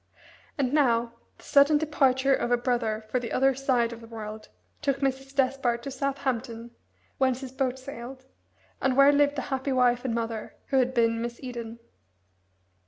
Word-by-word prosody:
And 270 Hz, -2 st, 0 dB
now, 235 Hz, -5 st, +2 dB, 0.2 s
the -, -, -19 dB
sudden 285 Hz, +2 st, +5 dB
departure 275 Hz, -3 st, +2 dB
of 240 Hz, -, 0 dB
a 245 Hz, -, +3 dB
brother 235 Hz, -3 st, -1 dB
for 255 Hz, -, +1 dB
the 235 Hz, -2 st, -6 dB
other 270 Hz, +1 st, +3 dB
side 250 Hz, -3 st, +1 dB
of 230 Hz, -, -10 dB
the 230 Hz, -, -12 dB
world 215 Hz, -1 st, -8 dB, 0.3 s
took 280 Hz, -2 st, 0 dB
Mrs. 270 Hz, 0 st, -2 dB
Despard 255 Hz, -3 st, +1 dB
to 275 Hz, -, -5 dB
Southampton, 260 Hz, -4 st, -3 dB, 0.5 s
whence 260 Hz, -1 st, +1 dB
his 260 Hz, -2 st, -7 dB
boat 260 Hz, -1 st, -1 dB
sailed, 260 Hz, 0 st, -9 dB, 0.6 s
and 265 Hz, -1 st, +1 dB
where 275 Hz, +1 st, +7 dB
lived 290 Hz, 0 st, +3 dB
the 270 Hz, -, -2 dB
happy 265 Hz, +1 st, -1 dB
wife 245 Hz, -1 st, +3 dB
and 245 Hz, -3 st, -1 dB
mother, 225 Hz, -1 st, -4 dB
who 270 Hz, -, +2 dB
had 255 Hz, 0 st, +2 dB
been 230 Hz, -1 st, +2 dB
Miss 235 Hz, 0 st, -5 dB
Eden. 235 Hz, -2 st, -6 dB
255 Hz, 170 wpm, -27 LUFS, 235-270 Hz, 0.6 s, where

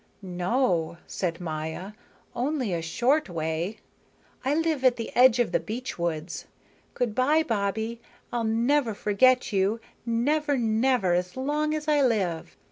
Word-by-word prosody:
"No," 180 Hz, -2 st, 0 dB
said 170 Hz, -3 st, -3 dB
Maya. 160 Hz, +3 st, -5 dB, 0.4 s
"Only 255 Hz, -, -1 dB
a 170 Hz, -, -1 dB
short 245 Hz, -, +1 dB
way. 165 Hz, +4 st, -2 dB, 0.7 s
I 270 Hz, +3 st, +1 dB
live 320 Hz, -4 st, 0 dB
at 255 Hz, -2 st, +5 dB
the 230 Hz, -, -6 dB
edge 250 Hz, -1 st, +6 dB
of 240 Hz, -, +1 dB
the -, -, +2 dB
beech 240 Hz, -1 st, -6 dB
woods. 165 Hz, -1 st, -3 dB, 0.5 s
Good 240 Hz, -4 st, -1 dB
by, 285 Hz, +7 st, +3 dB
Bobbie, 220 Hz, 0 st, -2 dB, 0.3 s
I'll 240 Hz, -1 st, 0 dB
never 230 Hz, +2 st, +1 dB
forget 245 Hz, +4 st, +3 dB
you, 200 Hz, +3 st, +1 dB, 0.2 s
never, 285 Hz, +5 st, +1 dB
never, 220 Hz, -5 st, +2 dB
so 180 Hz, +8 st, -9 dB
long 300 Hz, +2 st, 0 dB
as 305 Hz, 0 st, -5 dB
I 300 Hz, -1 st, +3 dB
live. 195 Hz, -10 st, 0 dB
230 Hz, 140 wpm, -26 LUFS, 180-260 Hz, 0.7 s, edge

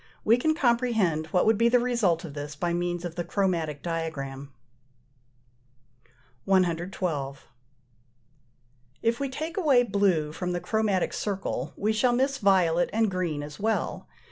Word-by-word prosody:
We 225 Hz, -, +6 dB
can 315 Hz, +5 st, +1 dB
comprehend 235 Hz, -, +1 dB
what 180 Hz, +3 st, +2 dB
would 220 Hz, -1 st, +3 dB
be 235 Hz, 0 st, +5 dB
the 245 Hz, -, +5 dB
result 230 Hz, -9 st, +1 dB
of 150 Hz, -, -8 dB
this 145 Hz, 0 st, -6 dB
by 170 Hz, +3 st, -1 dB
means 175 Hz, 0 st, -2 dB
of 170 Hz, -, -5 dB
the 175 Hz, -, -3 dB
chromatic 170 Hz, -5 st, -1 dB
diagram. 140 Hz, -5 st, -4 dB, 1.9 s
112. 170 Hz, -6 st, 0 dB, 1.6 s
If 230 Hz, +1 st, +1 dB
we 280 Hz, -1 st, -2 dB
take 315 Hz, +6 st, -5 dB
away 280 Hz, -9 st, +4 dB
blue 190 Hz, -9 st, +1 dB
from 180 Hz, +3 st, -3 dB
the 175 Hz, -, -1 dB
chromatic 200 Hz, 0 st, 0 dB
circle 200 Hz, -2 st, -3 dB
we 215 Hz, +2 st, +1 dB
shall 240 Hz, +3 st, +2 dB
miss 270 Hz, +2 st, +1 dB
violet 180 Hz, -4 st, +3 dB
and 220 Hz, -2 st, +1 dB
green 170 Hz, -5 st, -2 dB
as 150 Hz, 0 st, -9 dB
well. 220 Hz, +2 st, -1 dB
185 Hz, 140 wpm, -27 LUFS, 165-225 Hz, 1.9 s, We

